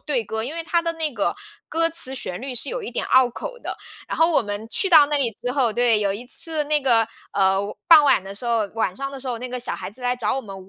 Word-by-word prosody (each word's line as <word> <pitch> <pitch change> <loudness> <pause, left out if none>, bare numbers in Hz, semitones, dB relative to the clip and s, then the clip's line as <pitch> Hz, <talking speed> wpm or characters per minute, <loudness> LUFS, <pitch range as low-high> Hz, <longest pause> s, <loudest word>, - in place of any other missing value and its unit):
队 260 -7 -1
歌， 220 +2 -4
因 255 +6 -5
为 330 0 -4
它 340 +1 +1
的 335 0 -2
那 320 -2 -2
个 205 -4 -1 0.3
歌 330 +1 +1
词 320 -5 +4
旋 180 -7 -6
律 265 +1 -5
是 245 +4 -1
有 - - -3
一 - - -6
点 - - -2
拗 260 -1 +4
口 - - -7
的。 - - -6 0.3
然 - - -3
后 325 - +5
我 - - +4
们 205 +1 -5
去 385 - +3
到 310 -5 +7
那 295 - 0
里 255 -4 +1
之 245 +4 -5
后， 255 -5 +1
对， 240 -1 +3
有 200 -1 0
一 225 +5 -7
次 315 +4 +1
那 300 0 +1
个， 235 -5 +3 0.3
呃， 195 -1 +2 0.3
傍 315 -3 +8
晚 270 -8 +3
的 195 - -8
时 210 - -8
候 230 -3 +1
晚 220 -5 -1
上 275 +3 -4
的 275 - -7
时 265 - -6
候， 245 - -2
那 250 +2 -6
个 250 0 -5
小 240 - -3
孩 - - -7
子 215 - -8
来 250 0 0
找 245 - -1
我 - - -2
们 195 -5 -11
250 Hz, 310 characters per minute, -22 LUFS, 220-295 Hz, 0.3 s, 傍